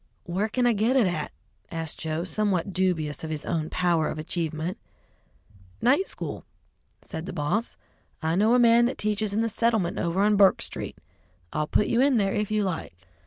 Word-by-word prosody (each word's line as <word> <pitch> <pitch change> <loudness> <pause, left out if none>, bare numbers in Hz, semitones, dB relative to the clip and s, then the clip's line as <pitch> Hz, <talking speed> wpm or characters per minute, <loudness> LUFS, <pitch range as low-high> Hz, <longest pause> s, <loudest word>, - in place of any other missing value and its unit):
"Where 190 +5 -1
can 250 +3 0
I 240 - +4
get 225 +5 +1
it 255 -5 +5
at?" 175 -5 -2 0.4
asked 165 -2 -5
Joe, 160 +1 -2
somewhat 195 -1 -1
dubious 165 -6 0
of 160 - -4
his 155 -2 -4
own 160 -2 -1
power 175 -3 +1
of - - -4
achievement. 160 +2 -3 1.0
"Night 280 +11 +3
school," - - -6 0.6
said 160 -1 -7
the - - -4
boss. 180 +9 -1 0.4
"I 160 +1 0
know 215 +5 +4
a - - +5
man 235 -1 +6
that 250 - -1
teaches 215 0 -1
in 210 +2 +1
the 230 - +1
Settlement 220 -7 +2
over 175 +3 +1
on 210 0 +3
Burk 195 -2 +5
Street. - - -5 0.6
I'll 150 0 -1
put 210 - +2
you 235 - +2
in 275 -2 +4
there 195 -2 +1
if 210 -1 -1
you 215 -1 +1
like." 175 - -3
190 Hz, 190 wpm, -26 LUFS, 165-220 Hz, 1.0 s, man